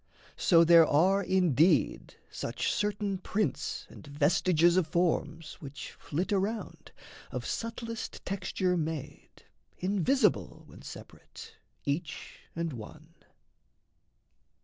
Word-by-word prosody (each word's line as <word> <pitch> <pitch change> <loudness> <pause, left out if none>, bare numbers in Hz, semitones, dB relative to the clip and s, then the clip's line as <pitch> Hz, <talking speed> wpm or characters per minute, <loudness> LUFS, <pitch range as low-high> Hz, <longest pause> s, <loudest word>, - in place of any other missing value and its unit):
So 170 -2 +5
there 165 -1 +7
are 185 +7 +3
indeed 180 -3 +2 0.2
Such - - -2
certain 205 -2 -1
prints 205 +2 -2
and - - -14
vestiges 165 +4 +3
of 185 -4 +2
forms 165 -2 -1
Which 140 -2 -8
flit 180 +7 -3
around, 205 +3 -3 0.4
of - - -5
subtlest 230 0 -5
texture 185 -1 -1
made, 155 -3 -5 0.3
Invisible, 205 +8 +1
when - - -14
separate, 455 0 -11 0.3
each 150 +3 -4 0.2
and 165 -2 -2
one. 155 +8 -11
175 Hz, 100 wpm, -30 LUFS, 155-195 Hz, 0.4 s, there